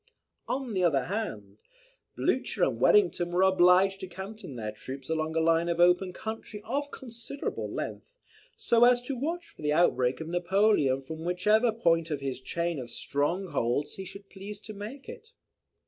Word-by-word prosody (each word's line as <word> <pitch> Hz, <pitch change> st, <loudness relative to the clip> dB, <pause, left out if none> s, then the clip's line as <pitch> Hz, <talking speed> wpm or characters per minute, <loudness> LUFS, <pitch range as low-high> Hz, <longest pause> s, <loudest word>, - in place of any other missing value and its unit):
On 260 Hz, -4 st, -2 dB
the 185 Hz, -2 st, +1 dB
other 140 Hz, -7 st, +3 dB
hand, 110 Hz, -, -5 dB, 0.5 s
Blucher -, -, 0 dB
and -, -, +1 dB
Wellington 360 Hz, -, +4 dB
were 180 Hz, +2 st, +3 dB
obliged 190 Hz, +1 st, +5 dB
to 190 Hz, -, -6 dB
canton 190 Hz, -4 st, -8 dB
their 110 Hz, -2 st, -4 dB
troops 130 Hz, +6 st, -9 dB
along 160 Hz, 0 st, -1 dB
a -, -, +3 dB
line 165 Hz, +1 st, +3 dB
of 170 Hz, 0 st, -1 dB
open 180 Hz, +2 st, +4 dB
country 220 Hz, +1 st, -6 dB
of 285 Hz, +5 st, -2 dB
considerable 240 Hz, +2 st, -6 dB
length, -, -, -5 dB, 0.5 s
so 240 Hz, -, +3 dB
as 245 Hz, 0 st, +6 dB
to 270 Hz, +2 st, -3 dB
watch 330 Hz, +7 st, -3 dB
for -, -, -16 dB
the 150 Hz, 0 st, +1 dB
outbreak 130 Hz, -6 st, +2 dB
of 160 Hz, -, -6 dB
Napoleon 175 Hz, -6 st, +2 dB
from 160 Hz, +4 st, -7 dB
whichever 210 Hz, +7 st, +3 dB
point 165 Hz, -7 st, +1 dB
of 150 Hz, -3 st, -2 dB
his 135 Hz, -2 st, -4 dB
chain 170 Hz, +2 st, -2 dB
of 120 Hz, -2 st, -7 dB
strongholds 145 Hz, 0 st, -1 dB
he 190 Hz, -, -5 dB
should 200 Hz, +2 st, -10 dB
please 200 Hz, +1 st, -8 dB
to 215 Hz, -, -9 dB
make 215 Hz, +7 st, -8 dB
it. 460 Hz, +1 st, -11 dB
180 Hz, 170 wpm, -29 LUFS, 155-220 Hz, 0.5 s, as